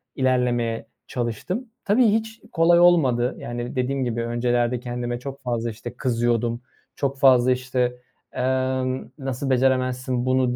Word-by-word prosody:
ilerlemeye 120 -3 0 0.2
çalıştım. 130 - -3 0.2
Tabii, 225 +5 +4
hiç 220 +1 -1
kolay 170 +1 +4
olmadı. 135 -9 +4
Yani, 120 0 -5
dediğim 130 +1 0
gibi, 120 -1 -2
öncelerde 120 +1 0
kendime 120 0 -4
çok 140 +2 -8
fazla, 120 -2 -2
işte, 115 +2 -8
kızıyordum, 120 -1 0 0.3
çok 135 -1 -2
fazla, 130 -2 +5
işte, 125 -1 0 0.4
emm, 130 0 -1
nasıl 135 -1 -3
beceremezsin 130 -1 +1
bunu 130 -1 +2
125 Hz, 125 wpm, -23 LUFS, 120-135 Hz, 0.4 s, fazla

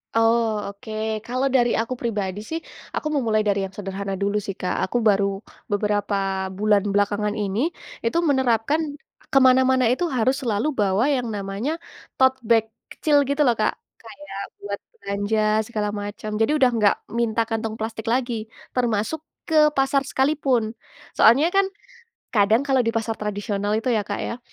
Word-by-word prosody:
Oh, 225 -2 +2
oke. 220 0 -4
Kalau 255 +4 -1
dari 240 -2 +3
aku 230 +3 -1
pribadi, 210 -5 -3
sih, 320 +10 -4 0.4
aku - - -2
memulai 220 -6 +1
dari 200 -1 +1
yang 190 - -10
sederhana 195 -1 -4
dulu, 200 +2 0
sih, 195 -1 -6
Kak. 180 - -2
Aku 240 -2 0
baru 200 -1 +3 0.3
beberapa 200 -2 0
bulan 210 0 +3
belakangan 205 +1 +1
ini, 210 - 0 0.3
itu 230 +8 0
menerapkan 265 +2 +2 0.5
ke - - +2
mana-mana 260 -1 +5
itu 260 +10 +1
harus 260 +1 +1
selalu 240 +4 0
bawa 205 -1 +2
yang 250 -3 -1
namanya 205 +8 -3 0.4
tote 260 0 +3
bag 225 -1 +3 0.2
kecil, 295 -2 +2
gitu, 285 +1 +2
loh, 245 - +4
Kak. 215 -1 0 0.2
Kayak 230 -3 -9 0.2
buat 200 0 -5 0.2
belanja, 205 +2 -1 0.3
segala 210 -3 -1
macam. 205 +1 -5
Jadi, 225 - +3
udah 260 -4 +5
nggak 210 -3 +3 0.2
minta 230 -1 +1
kantong 225 -1 -3
plastik 220 0 -4
lagi, 235 -3 -1 0.2
termasuk 240 +4 0 0.2
ke 305 -1 +5
pasar 270 +1 +3
sekali 270 +3 +2
pun. 250 -7 0 0.4
Soalnya, 285 +10 +5
kan, 390 0 +3 0.6
kadang, 215 +3 +3
kalau 265 -4 +1
di 230 - 0
pasar 225 0 -2
tradisional 205 0 -2
itu, 225 +4 0
ya, 215 -4 +1
Kak, 205 - -3
ya, 235 - -4
225 Hz, 160 wpm, -23 LUFS, 205-255 Hz, 0.6 s, mana-mana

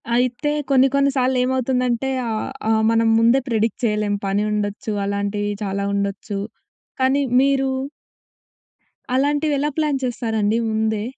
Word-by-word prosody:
అయితే 255 +4 0 0.2
కొన్ని 265 -1 +5
కొన్ని 280 0 +3
సాల్లేమవుతుందంటే 255 0 +1 0.2
ఆహ్, 220 -1 -2 0.2
ఆ! - - +4 0.2
మనం 230 0 +2
ముందే 235 +4 +4
ప్రెడిక్ట్ 225 -1 0
చేయలేం. 210 -1 0
పని 200 +2 +1
ఉండొచ్చు, 210 +1 -2
అలాంటియి 205 +1 -2
చాలా 200 0 -2
ఉండొచ్చు. 200 0 -3 0.6
కానీ 265 +2 +3 0.2
మీరు 270 -1 +2 1.5
అలాంటివెలా 290 +1 +1
ప్లాన్ 300 -3 +1
చేస్తారండి 225 -3 0
ముందే? 220 -1 0
230 Hz, 115 wpm, -21 LUFS, 210-265 Hz, 1.5 s, కొన్ని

